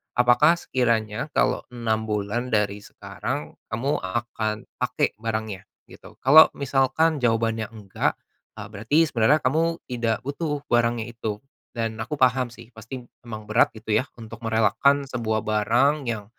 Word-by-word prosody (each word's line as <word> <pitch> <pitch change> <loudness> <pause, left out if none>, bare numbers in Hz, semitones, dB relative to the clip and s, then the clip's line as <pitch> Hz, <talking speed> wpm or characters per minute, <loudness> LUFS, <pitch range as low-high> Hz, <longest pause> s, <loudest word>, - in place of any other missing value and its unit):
Apakah 125 +6 +5
sekiranya 115 -7 -1
kalau - - +1
6 110 -2 -1
bulan 105 +4 -2
dari 105 -1 +1
sekarang 75 -6 -6 0.2
kamu 135 +6 0
akan 110 +2 -3 0.2
pakai - - 0
barangnya? 110 -3 -4 0.2
Gitu. - - -14
Kalau 155 +5 +9
misalkan 140 +4 +1
jawabannya 115 -2 +1
enggak, 100 -3 -2 0.4
eee, - - -7
berarti 110 +8 -1
sebenarnya 135 +6 +3
kamu 160 +6 +2
tidak 115 -3 -1
butuh 145 +1 -3
barangnya 120 -1 +2
itu, 110 -3 -5 0.4
dan 115 -1 -1
aku 130 +7 -3
paham 125 -1 +3
sih 115 -1 -14
pasti 115 +4 -8 0.2
memang 110 -2 -7
berat, 115 +3 +4
gitu 110 -1 -4
ya, 130 - 0 0.2
untuk 110 +1 -10
merelakan 125 +6 +3
sebuah 110 -4 -1
barang 120 +8 +2
yang 110 -3 -3
115 Hz, 140 wpm, -24 LUFS, 110-130 Hz, 0.4 s, Kalau